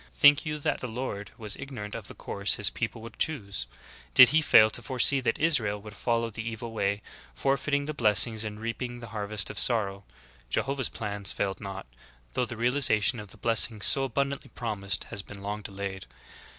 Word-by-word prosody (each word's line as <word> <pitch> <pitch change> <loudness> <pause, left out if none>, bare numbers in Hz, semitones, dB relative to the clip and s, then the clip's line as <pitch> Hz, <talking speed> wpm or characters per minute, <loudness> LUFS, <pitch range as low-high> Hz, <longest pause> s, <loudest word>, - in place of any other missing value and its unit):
Think 145 +2 +5
you 150 0 -2
that 145 - -2
the 125 - -5
Lord 110 -4 -5
was 105 -2 -3
ignorant 125 -7 -7
of - - -6
the - - -10
course 100 0 0
His - - +1
people 110 - -4
would 115 - -11
choose? 100 - -3 0.5
Did 125 -2 +10
He 160 +4 +3
fail 110 -7 +6
to - - -6
foresee 135 +1 +5
that 130 - -1
Israel 115 -11 +1
would 105 0 -12
follow 115 -1 -1
the 110 - -6
evil 115 +1 -6
way, 100 -2 -2 0.3
forfeiting 140 - 0
the 155 - -4
blessings 110 -2 +2
and 105 -1 -6
reaping 120 +2 -5
the 115 - -10
har 105 -2 -5
vest 105 -2 +1
of - - -6
sorrow? 100 -5 +1 0.5
Jehovah's 135 - -1
plans 100 -2 -3
failed 95 -1 -3
not, 95 -1 -7 0.5
though 125 - 0
the 120 -1 -8
realization 120 -2 +3
of 105 - -8
the - - -13
blessings 115 -2 +2
so 135 - +8
abundantly 140 +2 -3
promised 100 -4 -2
has 105 -3 -5
been 100 +1 -11
long 105 +1 -4
delayed. 100 -3 -7
115 Hz, 190 wpm, -27 LUFS, 100-130 Hz, 0.5 s, Did